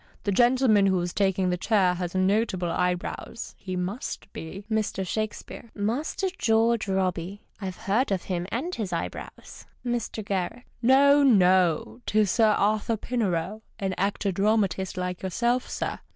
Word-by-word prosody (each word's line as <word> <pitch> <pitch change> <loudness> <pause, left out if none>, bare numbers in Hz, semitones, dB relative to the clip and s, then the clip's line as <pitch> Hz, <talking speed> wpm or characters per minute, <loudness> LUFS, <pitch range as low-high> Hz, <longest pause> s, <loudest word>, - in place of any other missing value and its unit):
The 200 - 0
gentleman 240 -2 +4
who 190 -1 +2
is 175 0 -3
taking 190 -2 +1
the 180 - 0
chair 190 -2 +2
has 180 0 -4
notable 185 -2 +1
eyebrows; 180 +5 -3
he 185 -1 -5
must 195 +3 -4
be 190 +5 -8
Mr. 215 -3 -1
Shakespeare. 215 +3 -5
— - - -37 0.2
Master 310 +9 -2
George 225 0 +2
Robey. 190 0 -2 0.2
I've 185 -2 -5
heard 225 +3 0
of 190 -2 0
him 180 -1 -3
and 310 +10 -2
his 215 - -3
eyebrows. - - -6 0.2
Mr. 235 -3 -3
G. 195 +5 -2
— - - -38
No, 280 +4 +6
no, 180 - +3
'tis 210 -3 +2
Sir 225 -2 +4
Arthur 215 +2 +1
Pinero, 210 -4 -2 0.2
an 195 -3 -2
actor 195 +1 0
dramatist 195 -2 0
like 180 0 -3
yourself, 235 +7 0
sir. - - -3
200 Hz, 150 wpm, -26 LUFS, 185-230 Hz, 0.2 s, No